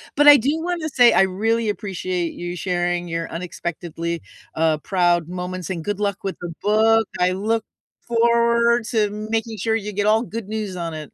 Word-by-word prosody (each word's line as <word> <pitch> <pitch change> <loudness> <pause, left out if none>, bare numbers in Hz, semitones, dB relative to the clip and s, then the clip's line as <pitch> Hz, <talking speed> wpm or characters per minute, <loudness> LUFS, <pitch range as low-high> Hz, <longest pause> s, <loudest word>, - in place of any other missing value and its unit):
But 290 +1 +4
I 290 -1 +11
do 270 +6 +1
wanna 345 -3 -2
say 245 -3 +5
I 180 - +5
really 220 +4 0
appreciate 185 -4 -3
you 175 0 -5
sharing 175 -1 -1
your 165 0 -3
unexpectedly, 170 -1 -5 0.3
uh, 160 -1 +2
proud 175 0 +1
moments, 180 0 -5
and 170 -3 -4
good 205 +2 -3
luck 200 -1 -2
with 195 - -3
the 175 -1 -5
book. 220 +1 +3
I 180 0 +3
look 215 +4 -1 0.4
forward 235 0 +2
to 215 -4 +2
making 220 +1 -3
sure 220 +3 0
you 210 -1 -3
get 205 +1 -1
all 220 +1 +4
good 225 -3 -6
news 215 -3 -4
on 170 -2 -4
it. 155 -2 -8
200 Hz, 185 wpm, -22 LUFS, 175-225 Hz, 0.4 s, I